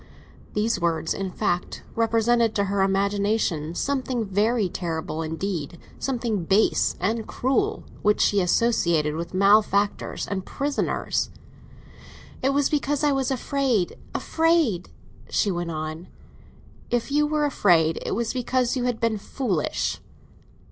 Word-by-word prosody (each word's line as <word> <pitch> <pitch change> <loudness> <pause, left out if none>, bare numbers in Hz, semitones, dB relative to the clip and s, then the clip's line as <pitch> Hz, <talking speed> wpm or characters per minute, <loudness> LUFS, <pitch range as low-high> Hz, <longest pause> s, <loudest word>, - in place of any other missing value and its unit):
These 210 -1 +1
words, 165 -2 0
in 195 -1 -3
fact, 180 0 -2
represented 230 0 +2
to 200 - +2
her 200 0 0
imagination 195 -4 0
something 260 -3 -1
very 210 +2 +1
terrible 165 -2 -3
indeed, 165 0 -3 0.2
something 235 -7 -1
base 195 +6 +2
and 220 +5 -1
cruel, 330 - 0 0.2
which 210 0 +3
she 200 -1 +3
associated 170 -6 +2
with 170 +3 -5
malefactors 200 +1 +2
and 190 -2 -3
prisoners. 280 +6 -1 1.1
"It 265 - +2
was 280 0 +2
because 290 -1 0
I 295 - +4
was 270 -2 0
afraid—afraid—" 270 - 0 0.4
she 205 - +1
went 175 -1 -3
on. 155 +2 -5 0.8
"If 240 +2 -1
you 295 +1 +3
were 300 0 +1
afraid, 170 - +3
it - - -2
was 230 +1 -1
because 250 0 0
you 250 -1 -1
had 245 -2 -1
been 230 -2 0
foolish!" 200 - -2
210 Hz, 125 wpm, -24 LUFS, 180-250 Hz, 1.1 s, I